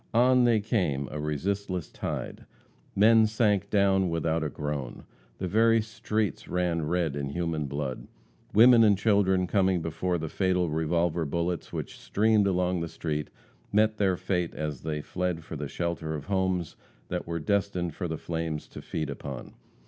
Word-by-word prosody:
On 125 Hz, +1 st, +5 dB
they 115 Hz, -3 st, +3 dB
came, 85 Hz, -, 0 dB
a 75 Hz, -, -4 dB
resistless 90 Hz, +4 st, -2 dB
tide. -, -, -5 dB, 0.5 s
Men 110 Hz, +2 st, +6 dB
sank 105 Hz, -3 st, +1 dB
down 95 Hz, -2 st, +3 dB
without 80 Hz, -1 st, 0 dB
a 75 Hz, -, -1 dB
groan. 75 Hz, -4 st, -5 dB, 0.3 s
The 95 Hz, -, -3 dB
very 115 Hz, +4 st, +4 dB
streets 110 Hz, -2 st, -2 dB
ran 85 Hz, -3 st, 0 dB
red 85 Hz, -3 st, 0 dB
in 70 Hz, -1 st, -3 dB
human 80 Hz, -1 st, -2 dB
blood. 70 Hz, -2 st, -4 dB, 0.4 s
Women 115 Hz, +1 st, +7 dB
and 105 Hz, -3 st, +5 dB
children, 95 Hz, -3 st, +3 dB
coming 95 Hz, -1 st, +2 dB
before 85 Hz, +2 st, -1 dB
the 80 Hz, -1 st, -4 dB
fatal 90 Hz, -1 st, 0 dB
revolver 85 Hz, +2 st, +1 dB
bullets 85 Hz, +3 st, -2 dB
which -, -, -6 dB
streamed 105 Hz, -1 st, +2 dB
along 90 Hz, -2 st, +1 dB
the 85 Hz, -, -2 dB
street, 75 Hz, -2 st, -3 dB, 0.4 s
met 110 Hz, +1 st, +3 dB
their 95 Hz, -3 st, +2 dB
fate 90 Hz, -3 st, -1 dB
as 75 Hz, -4 st, -4 dB
they 75 Hz, -1 st, -3 dB
fled 90 Hz, 0 st, -3 dB
for 80 Hz, -, -7 dB
the 75 Hz, -1 st, -4 dB
shelter 85 Hz, -1 st, -3 dB
of 75 Hz, -, -6 dB
homes 95 Hz, -3 st, -1 dB, 0.3 s
that -, -, -3 dB
were 85 Hz, 0 st, -2 dB
destined 90 Hz, 0 st, -1 dB
for 90 Hz, -, -4 dB
the 80 Hz, -1 st, -3 dB
flames 80 Hz, -2 st, -4 dB
to -, -, -9 dB
feed 80 Hz, -2 st, -3 dB
upon. 70 Hz, -2 st, -7 dB
90 Hz, 165 wpm, -28 LUFS, 80-100 Hz, 0.5 s, Women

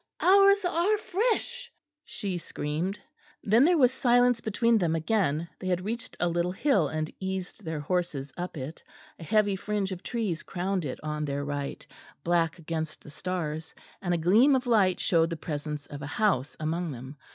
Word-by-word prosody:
"Ours 395 Hz, +1 st, +6 dB
are 355 Hz, +5 st, +2 dB
fresh," 475 Hz, +4 st, -1 dB, 0.3 s
she 190 Hz, -9 st, -4 dB
screamed. 165 Hz, +6 st, -3 dB, 0.4 s
Then 225 Hz, +6 st, +5 dB
there 350 Hz, +1 st, +4 dB
was 255 Hz, -4 st, +5 dB
silence 245 Hz, -2 st, +3 dB
between 230 Hz, +1 st, +2 dB
them 165 Hz, -3 st, +1 dB
again; 165 Hz, -2 st, 0 dB
they 185 Hz, -, -5 dB
had 180 Hz, 0 st, 0 dB
reached 235 Hz, +3 st, -4 dB
a 175 Hz, -, +2 dB
little 175 Hz, +1 st, 0 dB
hill 195 Hz, -, +2 dB
and 155 Hz, +1 st, -3 dB
eased 190 Hz, -1 st, -4 dB
their 160 Hz, -2 st, -3 dB
horses 145 Hz, -4 st, -2 dB
up 175 Hz, -1 st, -5 dB
it; 140 Hz, +4 st, -6 dB, 0.4 s
a -, -, -8 dB
heavy 205 Hz, +2 st, +2 dB
fringe 200 Hz, 0 st, -2 dB
of 180 Hz, -1 st, -5 dB
trees 210 Hz, -9 st, -2 dB
crowned 185 Hz, -1 st, -2 dB
it 130 Hz, -, -4 dB
on 150 Hz, 0 st, -2 dB
their 140 Hz, 0 st, -2 dB
right, 145 Hz, -1 st, -4 dB, 0.4 s
black 170 Hz, -1 st, +1 dB
against 160 Hz, -1 st, -4 dB
the 150 Hz, -, -11 dB
stars, 160 Hz, -1 st, -4 dB, 0.3 s
and 175 Hz, -, -1 dB
a 175 Hz, -, +2 dB
gleam 215 Hz, -, +5 dB
of 260 Hz, 0 st, 0 dB
light 205 Hz, -7 st, +3 dB
showed 165 Hz, -2 st, +3 dB
the 165 Hz, -, -4 dB
presence 150 Hz, -2 st, -4 dB
of 145 Hz, -1 st, -9 dB
a 140 Hz, -, -5 dB
house 150 Hz, -, 0 dB
among 165 Hz, +2 st, -2 dB
them. 130 Hz, +3 st, -9 dB
180 Hz, 175 wpm, -28 LUFS, 155-225 Hz, 0.4 s, Ours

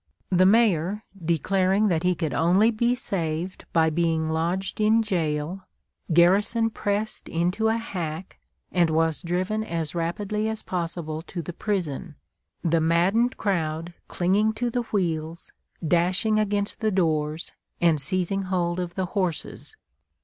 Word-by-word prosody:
The 185 Hz, 0 st, +5 dB
Mayor 205 Hz, -2 st, +3 dB, 0.2 s
declaring 190 Hz, +5 st, +2 dB
that 165 Hz, -3 st, +1 dB
he 180 Hz, 0 st, +2 dB
could 160 Hz, -5 st, -2 dB
only 180 Hz, -, +4 dB
be 235 Hz, +2 st, +1 dB
saved 175 Hz, -6 st, -3 dB
by 160 Hz, -1 st, +3 dB
being 160 Hz, -1 st, 0 dB
lodged 175 Hz, +6 st, -1 dB
in 220 Hz, +2 st, +4 dB
jail, 175 Hz, -1 st, -2 dB, 0.4 s
Garrison 205 Hz, +7 st, +4 dB
pressed 205 Hz, +1 st, -2 dB
into 180 Hz, +7 st, 0 dB
a 225 Hz, +1 st, +2 dB
hack, 175 Hz, -5 st, -5 dB, 0.3 s
and 175 Hz, -2 st, +3 dB
was 160 Hz, 0 st, +1 dB
driven 185 Hz, +5 st, -1 dB
as 165 Hz, -7 st, -3 dB
rapidly 205 Hz, +6 st, -2 dB
as 220 Hz, 0 st, -4 dB
possible 165 Hz, -3 st, -3 dB
to 175 Hz, -2 st, -5 dB
the 175 Hz, -, -6 dB
prison, 175 Hz, -5 st, -3 dB, 0.5 s
the 165 Hz, -1 st, +2 dB
maddened 185 Hz, +10 st, +2 dB
crowd 165 Hz, -4 st, -1 dB
clinging 200 Hz, +5 st, +1 dB
to 240 Hz, +2 st, -2 dB
the 245 Hz, -, 0 dB
wheels, 170 Hz, -7 st, -3 dB, 0.4 s
dashing 185 Hz, +6 st, +2 dB
against 205 Hz, 0 st, -1 dB
the 220 Hz, -2 st, +1 dB
doors 160 Hz, -4 st, 0 dB, 0.3 s
and 165 Hz, -4 st, +3 dB
seizing 185 Hz, +6 st, 0 dB
hold 180 Hz, -2 st, -1 dB
of 175 Hz, -1 st, -4 dB
the 190 Hz, -, -1 dB
horses. 185 Hz, -, -3 dB
180 Hz, 135 wpm, -25 LUFS, 165-205 Hz, 0.5 s, The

